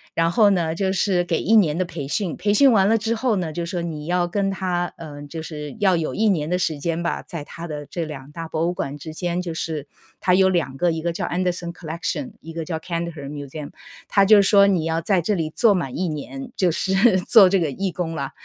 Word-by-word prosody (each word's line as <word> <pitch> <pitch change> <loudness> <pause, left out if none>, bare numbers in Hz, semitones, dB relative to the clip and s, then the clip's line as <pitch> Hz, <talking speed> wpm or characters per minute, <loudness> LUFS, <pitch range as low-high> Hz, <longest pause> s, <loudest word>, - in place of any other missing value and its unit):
然 165 0 +2
后 210 +1 +5
呢， 170 -4 +1
就 190 +2 0
是 185 -1 +1
给 170 -2 -1
1 220 - +3
年 170 -9 +4
的 185 - +2
培 155 -5 -6
训， 170 +3 -2
培 205 - 0
训 275 +5 +6
完 195 -4 +4
了 225 - +4
之 225 +2 -1
后 230 -1 +1
呢， 170 -3 -2
就 170 +2 -3
说 175 0 -3
你 155 -3 -5
要 175 +1 +1
跟 195 +2 0
它， 180 -2 -2
呃， 145 -3 -9
就 160 +3 -7
是 150 -2 -7
要 195 -3 +4
有 160 - -2
1 220 0 +2
年 155 -6 0
的 180 - +1
时 160 -4 0
间 165 +3 -2
吧， 170 - -2
在 165 -4 -7
它 170 +3 -9
的 150 -2 -6
这 170 -2 -4
2 145 -2 -9
大 165 +1 -6
博 160 +1 -1
物 175 - 0
馆 140 -4 -3
之 160 - -7
间， 175 +1 -2
就 170 -3 -5
是 155 -3 -4 0.3
它 180 - +3
有 190 0 +5
2 160 -7 -1
个， 175 +3 +2
一 160 0 -3
个 170 +1 -1
叫 165 - -3
Anderson 175 -1 -2
Collection， 160 -4 -4
一 165 - -9
个 165 0 -4
叫 160 0 -3
Cantor 165 -3 -5
Museum。 145 +1 -7 0.4
它 200 - +4
就 210 +2 +7
是 200 - +5
说 200 -1 +6
你 180 -5 +1
要 165 0 0
在 190 +2 +2
这 175 +5 0
里 160 -5 -1
做 215 +6 +3
满 165 -9 -3
1 185 - 0
年， 240 - -6
就 185 -3 +2
是 190 +4 +3
做 190 +1 +6
这 195 - +3
个 160 -4 0
义 190 +7 -2
工 170 -2 -3
了， 140 -4 -3
170 Hz, 340 characters per minute, -22 LUFS, 160-190 Hz, 0.4 s, 就